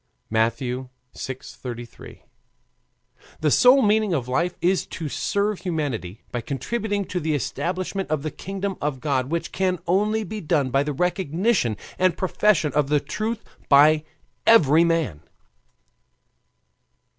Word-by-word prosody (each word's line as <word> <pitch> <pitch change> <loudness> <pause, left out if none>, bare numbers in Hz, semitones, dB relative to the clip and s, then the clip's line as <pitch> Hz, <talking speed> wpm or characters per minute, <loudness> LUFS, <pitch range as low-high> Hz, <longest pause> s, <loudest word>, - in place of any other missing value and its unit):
(Matt. 115 +1 +2
vi. 125 0 -4 0.3
33.) 125 -2 -8 1.2
The 155 -2 +2
sole 255 - +6
meaning 210 -3 +3
of 125 -5 -2
life 170 +8 0
is 185 +2 +1
to 160 - -5
serve 205 +6 -1
humanity 145 - -3
by 120 - -2
contributing 205 - -2
to 180 - -3
the 155 -2 0
establishment 180 - -3
of 155 -2 -1
the 155 - -3
kingdom 195 0 -4
of 145 -3 -2
God, 135 -2 -1
which 170 +1 -2
can 185 -1 0
only 210 +5 +1
be 210 +2 -6
done 150 -5 +1
by 135 - +3
the 150 +1 -1
recognition 180 - 0 0.2
and 185 -1 +2
profession 185 -4 +2
of 145 -2 +1
the 150 0 +3
truth 220 +8 -3 0.3
by 150 +2 +6 0.4
every 165 -8 +6
man. 165 - 0
165 Hz, 135 wpm, -24 LUFS, 140-195 Hz, 1.2 s, sole